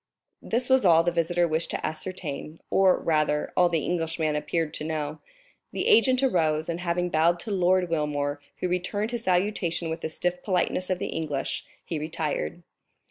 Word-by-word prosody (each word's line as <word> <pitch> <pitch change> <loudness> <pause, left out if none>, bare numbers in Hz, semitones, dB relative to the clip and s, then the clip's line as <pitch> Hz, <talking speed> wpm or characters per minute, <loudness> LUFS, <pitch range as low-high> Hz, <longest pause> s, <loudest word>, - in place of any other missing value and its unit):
This 245 +2 0
was 260 -2 +4
all 165 -3 +6
the 175 - +1
visitor 175 +1 +1
wished 160 +1 -1
to - - -3
ascertain, 160 -2 -5
or, 190 -1 +4
rather, 155 -2 0
all 180 -1 +5
the 165 -4 0
Englishman 165 -3 -1
appeared 150 +1 -1
to - - -4
know. 155 -1 -3 0.5
The - - -1
agent 255 +3 +5
arose, 160 - +2
and 170 0 -2
having 175 0 -1
bowed 170 +2 +3
to 220 - -6
Lord 185 -1 +3
Wilmore, 145 -3 -1 0.2
who - - +1
returned 180 +5 -1
his 235 -1 -4
salutation 180 -3 0
with 165 +1 -4
the - - -3
stiff 180 +2 -2
politeness 185 -1 0
of 185 - +1
the - - -4
English, 145 -4 -3 0.2
he 165 - -3
retired. 155 - -3
170 Hz, 175 wpm, -26 LUFS, 155-180 Hz, 0.5 s, all